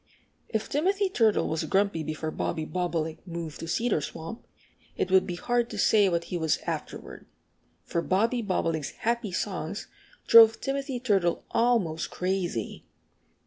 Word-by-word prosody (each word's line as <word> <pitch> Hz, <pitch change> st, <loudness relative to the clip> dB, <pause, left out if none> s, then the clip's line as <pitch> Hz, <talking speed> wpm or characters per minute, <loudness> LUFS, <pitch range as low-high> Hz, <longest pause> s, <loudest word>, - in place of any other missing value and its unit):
If 220 Hz, -1 st, -2 dB
Timothy 385 Hz, +7 st, +1 dB
Turtle 225 Hz, -, +2 dB
was 160 Hz, 0 st, -1 dB
grumpy 195 Hz, -4 st, +1 dB
before 155 Hz, +1 st, -4 dB
Bobby 155 Hz, 0 st, -2 dB
Bobolink 165 Hz, -3 st, -2 dB
moved 165 Hz, -3 st, -6 dB
to 165 Hz, -, -6 dB
Cedar 210 Hz, 0 st, +1 dB
Swamp, 165 Hz, +9 st, -7 dB, 0.5 s
it -, -, -1 dB
would 190 Hz, 0 st, +5 dB
be 175 Hz, -, -3 dB
hard 240 Hz, +5 st, 0 dB
to -, -, -7 dB
say 205 Hz, -3 st, +4 dB
what 170 Hz, -1 st, 0 dB
he 175 Hz, -, -4 dB
was 160 Hz, -2 st, +1 dB
afterward. -, -, -6 dB, 0.6 s
For 170 Hz, -, -2 dB
Bobby 225 Hz, +8 st, +1 dB
Bobolink's 165 Hz, -7 st, -1 dB, 0.2 s
happy 235 Hz, -3 st, 0 dB
songs 185 Hz, 0 st, -3 dB, 0.4 s
drove 225 Hz, -1 st, +8 dB
Timothy 275 Hz, -1 st, -3 dB
Turtle 195 Hz, -8 st, +1 dB
almost 215 Hz, -10 st, +1 dB
crazy. 180 Hz, -, -2 dB
190 Hz, 145 wpm, -27 LUFS, 165-230 Hz, 0.6 s, drove